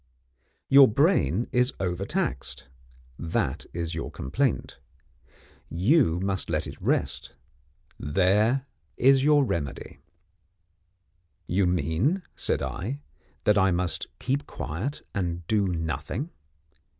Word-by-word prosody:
Your 135 0 +8
brain 115 - +2
is 125 +2 +2
over 90 0 -2
taxed 65 -4 -3 0.5
that 80 -3 -2
is 85 -1 -3
your - - -4
complaint. 125 - -2 0.9
You 90 - +3
must 95 -1 -1
let - - 0
it - - -9
rest - - -1 0.6
there 100 - +2 0.3
is 135 +1 +5
your 145 -1 +5
remedy." 85 - -4 1.5
"You 95 +1 +1
mean," 90 - +1
I - - -29
said, 130 +10 -2 0.4
"that 105 -1 +4
I 95 0 +4
must 90 -1 -1
keep 135 +3 -2
quiet, 95 - -5
and 85 -3 -2
do 105 0 +2
Nothing?" 85 - -3
95 Hz, 105 wpm, -26 LUFS, 85-130 Hz, 1.5 s, Your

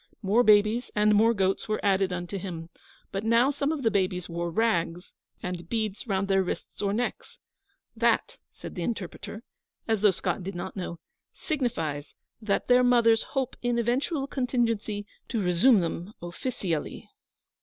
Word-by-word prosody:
More 205 +5 +4
babies 215 +2 +4
and 210 0 +4
more 220 +2 +5
goats 195 -3 0
were 215 0 0
added 195 -1 +3
unto 180 +2 -4
him; 170 -3 -6 0.4
but 195 +1 -3
now 230 +4 +4
some 285 +1 -1
of 305 -4 -3
the 225 - +3
babies 185 -3 0
wore 170 0 -3
rags, 175 -3 0 0.3
and 175 -2 -5
beads 215 -1 -2
round 195 -1 0
their 195 -1 +3
wrists 185 - -5
or 200 -1 +1
necks. 240 +4 -3 0.6
'That,' - - +1
said - - -9
the 180 - -5
interpreter, 215 +2 -5 0.4
as 220 -3 +1
though 210 - +6
Scott 190 +2 -1
did 195 +1 -5
not 175 +2 -5
know, 180 -3 -5 0.4
'signifies 165 - -2 0.3
that 210 -2 0
their 250 0 +6
mothers 235 -2 +5 0.2
hope 260 -1 0
in 245 -1 0
eventual 265 +5 0
contingency 230 -6 -1 0.2
to 230 - -1
resume 190 +4 +5
them 170 +4 -4
offeecially.' 175 - -4
210 Hz, 155 wpm, -27 LUFS, 180-235 Hz, 0.6 s, though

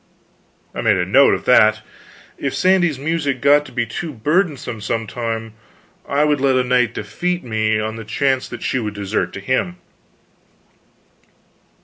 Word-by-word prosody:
I - - -4
made 110 -4 +3
a 90 - 0
note 135 +10 +5
of - - -8
that. 110 -3 +4 0.6
If 140 - -2
Sandy's 180 -5 +2
music 145 -2 -1
got 145 +2 +4
to - - -13
be 120 -1 -1
too 155 +8 -5
burdensome, 145 - -1
some 115 +2 -2
time, 115 -1 -4 0.6
I 140 +1 +2
would 150 -2 +1
let 135 -1 +3
a 130 - +3
knight 125 -2 +1
defeat 175 - -3
me, 110 -2 0
on 110 +1 -3
the 115 - -7
chance 130 +4 0
that - - -8
she 130 - 0
would 105 -3 -4
desert 100 +1 -2
to - - -6
him. 130 - -1
125 Hz, 160 wpm, -19 LUFS, 110-145 Hz, 0.6 s, note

